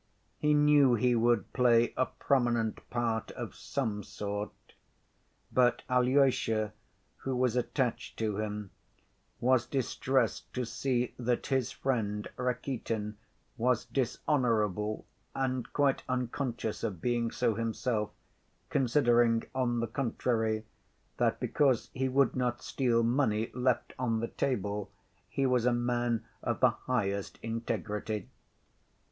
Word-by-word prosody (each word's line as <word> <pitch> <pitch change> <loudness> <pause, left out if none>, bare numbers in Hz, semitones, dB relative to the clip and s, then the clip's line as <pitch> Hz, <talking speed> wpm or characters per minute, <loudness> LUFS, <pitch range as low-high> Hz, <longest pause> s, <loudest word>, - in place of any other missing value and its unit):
He 150 0 +3
knew 145 -3 +6
he 125 +2 +3
would 115 -3 +2
play 120 -2 +4
a 130 - +1
prominent 120 -5 0
part 115 -2 -1
of - - -6
some 110 -7 -2
sort, 105 0 -4 1.0
but 125 -1 +3
Alyosha, 125 -4 +3 0.4
who 135 -1 -3
was 125 -1 +1
attached 125 -1 -1
to 110 -3 -1
him, 105 -2 -4 0.7
was 125 -1 +3
distressed 130 -2 0
to 125 -1 -1
see 125 +1 -1
that 120 0 0
his 130 -4 0
friend 105 -6 -1
Rakitin 120 -4 -2 0.4
was 125 0 +2
dishonorable, 110 - 0 0.3
and 130 -2 -1
quite 140 -2 +2
unconscious 125 -2 -2
of 100 -7 -2
being 120 +2 0
so 120 0 +1
himself, 115 -1 -1 0.6
considering, 120 -3 +3
on 120 -3 0
the 115 - -1
contrary, 110 -3 -1 0.5
that - - +1
because 135 -5 +1
he 130 0 0
would 135 0 +3
not 125 -1 -1
steal 120 -3 +1
money 115 -3 +1
left 125 0 0
on 115 -3 +1
the 115 - -2
table 105 -5 -2 0.4
he 135 - 0
was 125 -2 +3
a - - +5
man 120 -1 0 0.2
of - - -1
the - - +5
highest 100 -6 -2
integrity. 110 -2 -3
120 Hz, 120 wpm, -31 LUFS, 110-130 Hz, 1.0 s, knew